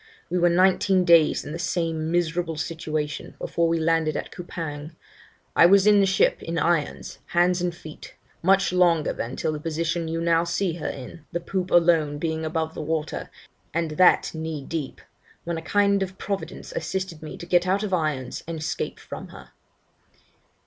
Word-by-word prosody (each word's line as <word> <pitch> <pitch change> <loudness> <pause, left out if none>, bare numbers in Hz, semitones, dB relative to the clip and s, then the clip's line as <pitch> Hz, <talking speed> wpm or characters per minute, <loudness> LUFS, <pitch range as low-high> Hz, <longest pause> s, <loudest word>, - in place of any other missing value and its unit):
We 180 - +1
were 175 0 +4
nineteen 185 +1 +3
days 170 -3 +5
in 145 - -6
the 165 - -5
same 165 -2 -1
miserable 170 -1 0
situation 155 -2 -4
before 170 0 0
we 165 0 +1
landed 160 -1 +1
at - - -5
Coupang. 160 -3 -6 0.6
I 170 - +8
was 195 +1 +5
in 210 -1 +6
the 195 - +4
ship, 190 - +2
in 165 0 -4
irons, 165 -1 -1 0.2
hands 175 +1 +3
and 175 0 0
feet, 155 -3 -11 0.3
much 195 +1 +3
longer 170 -4 +3
than 120 +3 -5
till - - -1
the 150 - -4
position 165 +1 -2
you 165 +1 -2
now 165 0 +2
see 170 +1 -1
her 150 - -3
in, 135 +5 -9
the 170 - -2
poop 185 +1 -3
alone 165 -4 +3
being 160 +1 -2
above 160 0 -2
water 155 0 -3 0.5
(and 165 -2 0
that 180 +4 +4
knee 160 -2 -4
deep), 155 -4 -5 0.4
when 170 -1 -3
a - - -9
kind 200 +1 +1
Providence 200 - -5
assisted 190 - -4
me 155 - -8
to - - -8
get 175 +1 +2
out 195 +3 +1
of 200 -3 -3
irons 150 -7 -1
and 165 -1 -4
escape 155 0 -4
from - - -8
her.' - - -13
165 Hz, 175 wpm, -25 LUFS, 160-180 Hz, 0.6 s, I